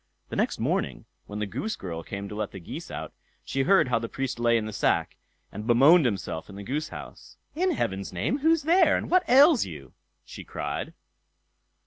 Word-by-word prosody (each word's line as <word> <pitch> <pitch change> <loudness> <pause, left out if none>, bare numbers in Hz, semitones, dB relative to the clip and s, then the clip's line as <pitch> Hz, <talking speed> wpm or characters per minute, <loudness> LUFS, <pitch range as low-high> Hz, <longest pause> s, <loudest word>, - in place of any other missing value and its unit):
The - - -5
next - - 0
morning, - - -2 0.2
when 105 - -6
the 105 - -1
goose 205 - -4
girl 85 -3 -6
came 100 +4 -6
to 105 - -8
let 105 -1 -3
the 95 - -9
geese 85 - -8
out, - - -6 0.3
she 135 - -2
heard 170 -1 +4
how 120 -2 +2
the 115 0 -5
Priest 135 -2 -3
lay 120 0 +3
in 110 - -2
the 110 - -6
sack, 105 - +1 0.4
and 105 +2 -7
bemoaned 140 +7 +6
himself 95 -7 -3
in 100 - -10
the 100 - -7
goose 150 +8 -3
house. - - -11 0.2
"In 370 +4 +1
heaven's 100 - -2
name, 105 - -1
who's 320 +1 +3
there, 340 +2 +4
and - - -5
what 365 0 +3
ails 275 +2 +7
you?" - - -9 0.3
she - - -9
cried. - - -5
120 Hz, 200 wpm, -26 LUFS, -, 0.4 s, ails